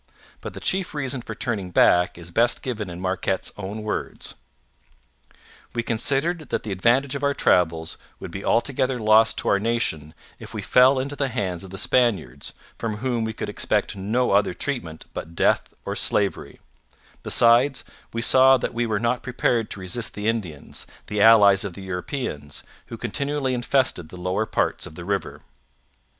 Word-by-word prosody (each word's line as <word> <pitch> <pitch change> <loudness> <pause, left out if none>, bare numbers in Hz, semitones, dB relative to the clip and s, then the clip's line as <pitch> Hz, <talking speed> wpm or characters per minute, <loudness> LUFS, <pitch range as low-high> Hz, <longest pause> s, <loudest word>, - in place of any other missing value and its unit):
But - - -8
the - - -6
chief 190 -4 0
reason 135 -3 -2
for 120 - -7
turning 105 -7 -2
back 90 0 +4
is 85 0 -7
best 120 +6 +1
given 110 -7 -4
in 85 0 -7
Marquette's 95 0 -1
own 105 +2 -6
words: 105 - -4 1.4
We 115 - 0
considered 140 +7 -1
that - - -2
the 110 - -5
advantage 120 +8 +2
of 140 - -3
our 140 0 +1
travels 80 -2 +1 0.2
would - - -8
be 95 +3 -6
altogether 130 +1 +1
lost 110 0 +5
to - - -1
our 100 - +3
nation 90 -9 -1 0.2
if - - -10
we - - -4
fell 130 +2 +5
into 140 +2 -2
the 140 -1 0
hands 95 -7 -3
of 95 - -10
the 95 - -8
Spaniards, 95 - +1 0.3
from 110 -2 -3
whom 120 -1 -1
we 110 - -2
could - - -5
expect - - 0
no 110 +6 0
other 100 -2 +2
treatment 85 - -4
but 85 +2 -7
death - - +2
or - - -3
slavery; 100 -2 0 0.6
besides, 120 +4 +4 0.3
we 115 0 -2
saw 130 +1 +6
that - - -3
we 120 0 -1
were 110 -2 0
not 120 +2 0
prepared 120 -3 0
to - - -5
resist 95 +6 -3
the 105 +1 -3
Indians, 95 -11 -3 0.2
the 105 -1 -2
allies 100 -3 +7
of 100 -3 -5
the 95 - -10
Europeans, 90 - -5 0.2
who - - -7
continually 140 -2 -1
infested 120 - 0
the 90 - -10
lower 95 +4 -1
part - - -1
of 80 - -12
the 85 - -8
river. 100 0 -3
110 Hz, 175 wpm, -24 LUFS, 95-125 Hz, 1.4 s, allies